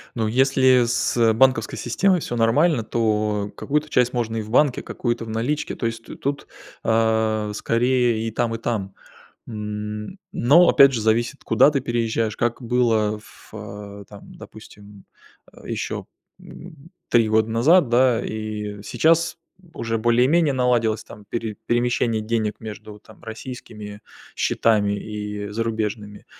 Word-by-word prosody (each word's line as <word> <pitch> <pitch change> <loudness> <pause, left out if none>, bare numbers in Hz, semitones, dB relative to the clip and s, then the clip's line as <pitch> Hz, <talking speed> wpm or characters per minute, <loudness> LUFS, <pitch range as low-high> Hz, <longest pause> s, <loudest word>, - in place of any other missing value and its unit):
Ну 115 -2 -1
если 130 +1 +4
с 115 -1 +2
банковской 130 +3 +2
системой 180 +9 +1
всё 120 - -4
нормально, 120 +5 +3
то 105 -2 -1
какую-то 150 +2 -1
часть 125 -3 +2
можно 115 -2 -2
и - - -2
в 105 - -10
банке, 130 +2 +2
какую-то 120 -2 -3
в - - -10
наличке, 120 +7 -2
то 115 - -3
есть 115 0 -4
т - - -9
тут, 140 +1 -3 0.4
а, 110 -1 +1
скорее, 120 0 +1
и - - -2
там, 115 +1 -1
и - - -4
там. 110 -5 -3 0.5
М. 105 - -6
Но 155 +9 +5
опять 135 0 +6
же, 115 - -1
зависит, 115 +5 0
куда 150 - +4
ты 140 - 0
переезжаешь, 115 -2 -1
как 120 +2 -1
было 115 -3 +1
в, 105 - -18
а, 100 -1 -9
там, 100 -1 -13
допустим, 100 -1 -14 0.5
э, - - -13
еще, - - -4 0.3
м, 165 -3 -13 0.2
3 115 -2 +3
года 110 +1 +2
назад, 135 +7 +4
да. 120 -1 +3
И 105 -1 -5
сейчас 165 +7 +2 0.4
уже 115 0 -2
более-менее 125 +7 +3
наладилось 120 -4 +1
там 105 - -13
пере 115 -3 -4
перемещение 120 -2 0
денег 110 -1 -2
между 105 -1 -9
там 110 - -19
российскими 110 -3 -8 0.3
счетами 105 -3 +1
и 105 -1 -6
зарубежными. 105 -1 -4
115 Hz, 145 wpm, -22 LUFS, 110-125 Hz, 0.5 s, опять